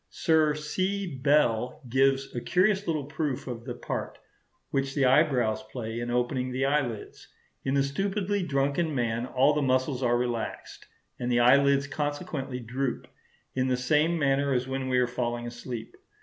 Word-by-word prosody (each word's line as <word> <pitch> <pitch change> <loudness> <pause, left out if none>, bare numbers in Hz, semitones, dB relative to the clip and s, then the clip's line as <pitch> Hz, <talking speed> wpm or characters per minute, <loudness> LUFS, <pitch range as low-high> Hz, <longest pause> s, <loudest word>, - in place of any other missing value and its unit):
Sir 155 -2 +2
C. 185 +6 -2
Bell 125 -4 +2
gives 135 +2 +2
a 120 - -2
curious 190 - +2
little 155 -3 0
proof 140 -2 -3
of 120 -2 -6
the - - -5
part - - -5 0.5
which 135 0 -1
the 140 -3 +3
eyebrows 125 -5 +3
play 115 -2 -4
in 120 0 -3
opening 125 +1 0
the 130 +2 0
eyelids. 135 -6 -2 0.4
In 135 +1 0
a 135 - +3
stupidly 195 +7 -1
drunken 145 0 0
man 120 -1 -1
all 130 +4 +3
the 150 - 0
muscles 130 0 +1
are 120 -1 +2
relaxed, 120 -2 -4 0.3
and 125 0 -2
the 120 0 +3
eyelids 140 +3 +5
consequently 145 -2 -3
droop, 125 +2 -3 0.5
in 130 0 0
the 130 -1 +1
same 150 +6 +2
manner 140 -1 +2
as 125 0 0
when 130 0 -3
we 125 - +2
are 125 - +4
falling 120 -1 -3
asleep. 120 -1 -7
135 Hz, 165 wpm, -28 LUFS, 125-150 Hz, 0.5 s, eyelids